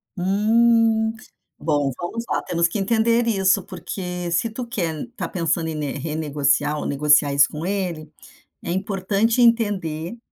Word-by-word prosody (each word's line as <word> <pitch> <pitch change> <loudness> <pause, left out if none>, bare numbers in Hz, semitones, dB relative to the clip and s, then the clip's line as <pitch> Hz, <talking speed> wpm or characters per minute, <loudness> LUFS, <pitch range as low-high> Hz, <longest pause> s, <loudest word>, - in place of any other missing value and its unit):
Hum, 220 +3 +3 0.5
bom, 145 -2 0
vamos 225 +7 -4
lá, - - 0
temos 170 0 +1
que 190 +5 -4
entender 230 +3 +2
isso, 195 -4 +2
porque 180 -1 -5
se 175 +7 +1
tu 240 +3 -6
quer 175 -10 -3
está 245 - -5
pensando 165 -2 -1
em 160 - -4
ne 150 -2 -3
renegociar 150 -1 0
ou - - -5
negociar 150 0 +3
isso 140 0 +5
com 155 +2 -6
ele, 180 -6 -3 0.5
é - - -5
importante 195 +5 0
entender 205 -6 +1
180 Hz, 145 wpm, -22 LUFS, 155-220 Hz, 0.5 s, isso